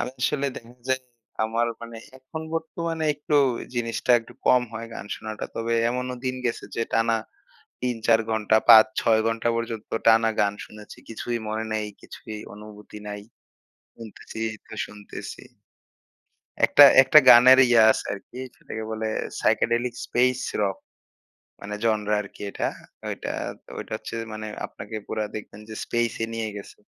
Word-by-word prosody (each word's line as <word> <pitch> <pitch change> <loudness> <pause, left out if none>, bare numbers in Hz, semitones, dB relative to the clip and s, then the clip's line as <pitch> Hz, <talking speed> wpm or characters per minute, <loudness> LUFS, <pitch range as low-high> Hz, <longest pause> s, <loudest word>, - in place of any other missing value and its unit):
আমি 125 - -2
আসলে 140 +1 +1
দেখা 115 +1 -10 0.2
যায় 130 0 +1 0.4
আমার 115 +2 0
মানে 115 0 -9 0.2
এখন 130 +5 -8
বর্তমানে 165 0 -3
একটু 150 +1 -1 0.4
জিনিসটা 120 +1 -2
একটু 115 +2 -15
কম 125 -1 +5
হয় 115 +1 -6
গান 100 - -7
শোনাটা। 110 -1 -6
তবে 115 0 -2 0.2
এমনও 125 +1 -3
দিন 130 0 -1
গেছে 115 - -3
যে 115 - +1
টানা 115 0 +2 0.7
৩-৪ 115 -2 +2
ঘণ্টা, 110 0 +2
৫-৬ 110 0 +6
ঘণ্টা 115 +1 0
পর্যন্ত 115 -2 -4 0.2
টানা 115 0 +6
গান 100 0 +2
শুনেছি। 105 0 -13
কিছুই 120 +1 -3
মনে 110 +1 -2
নাই, 110 -1 -1 0.2
কিছুই 110 -1 -9 0.2
অনুভূতি 105 0 -11
নাই। 105 0 -6 0.7
শুনতেছিই 115 0 -6 0.2
তো - - -11
শুনতেছি। 105 -1 -9 1.2
একটা, 145 - +8 0.2
একটা, 145 +3 +7
গানের 125 +2 +9
ইয়া 120 -2 +6
আছে - - 0
আরকি, 100 +5 -9 0.2
সেটাকে 110 - -7
বলে 110 0 -3 0.3
psychedelic 120 +1 +1
space 125 +1 +1 0.2
rock 100 -2 0 0.8
মানে 105 +1 -6
জনরা 105 -2 +1
আরকি 100 - -15
এটা। - - -2 0.4
ওইটা - - -5 0.3
তো - - -19
ওইটা - - -8
হচ্ছে - - -8 0.2
মানে 110 0 -6 0.2
আপনাকে 105 +2 -9
পুরা 110 -1 -2
দেখবেন 105 -1 -8
যে - - -6
স্পেসে 120 -1 -1
নিয়ে 115 -1 -2
গেছে। 100 - -10
115 Hz, 145 wpm, -25 LUFS, 110-120 Hz, 1.2 s, গানের